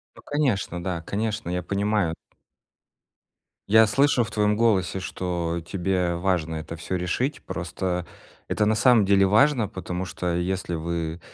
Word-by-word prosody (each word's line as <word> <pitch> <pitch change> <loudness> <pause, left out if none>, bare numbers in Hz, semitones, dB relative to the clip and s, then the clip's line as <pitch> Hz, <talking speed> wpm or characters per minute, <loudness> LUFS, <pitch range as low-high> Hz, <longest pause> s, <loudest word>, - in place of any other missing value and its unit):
Ну, - - -14
конечно, 120 - -1
да, 85 -2 -3
конечно, 105 +2 -3
я 90 0 -1
понимаю. 100 -2 0 1.5
Я 110 +1 +7
слышу 135 +2 +3
в - - -6
твоем 105 0 +1
голосе, 100 -5 +2
что 85 -2 -3
тебе 90 -1 0
важно 85 -3 0
это 80 +1 -6
всё 90 +3 -3
решить. 125 - -2
Просто 90 0 -3 0.4
это 105 - +1
на 110 - +3
самом 115 -2 +5
деле 100 0 +4
важно, 110 +4 +4
потому 90 -1 -5
что 90 -1 -3
если 90 0 -2
вы 85 0 -3
95 Hz, 145 wpm, -25 LUFS, 85-105 Hz, 1.5 s, Я